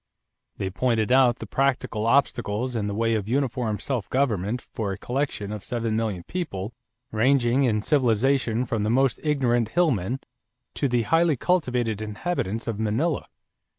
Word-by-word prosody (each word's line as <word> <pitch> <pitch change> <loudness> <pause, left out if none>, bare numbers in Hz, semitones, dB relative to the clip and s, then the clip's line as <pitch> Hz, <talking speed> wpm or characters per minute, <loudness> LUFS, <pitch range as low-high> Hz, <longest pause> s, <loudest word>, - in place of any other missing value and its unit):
They 95 -1 -3
pointed 115 +3 0
out 130 -2 +5
the - - -8
practical 125 -5 0
obstacles 120 -2 +1
in 105 -3 -1
the 100 - -3
way 115 +1 +1
of 105 -1 -2
uniform 125 -4 0
self 125 -4 -3
government 120 -4 0
for 110 -4 -5
a 95 - -4
collection 125 -4 -3
of 105 -3 -6
seven 115 -2 -2
million 110 -6 -2
people 115 - -4 0.4
ranging 125 +3 +3
in 105 -3 +1
civilization 125 -2 +2
from 115 -2 -2
the 105 - 0
most 130 +2 +2
ignorant 120 -7 +1
hill 175 +4 +3
men 115 +4 -2 0.5
to 140 - 0
the 120 -2 +1
highly 165 +4 +3
cultivated 125 - 0
inhabitants 110 - -3
of 115 -3 -3
Manila. 120 +9 0
120 Hz, 155 wpm, -25 LUFS, 110-135 Hz, 0.5 s, out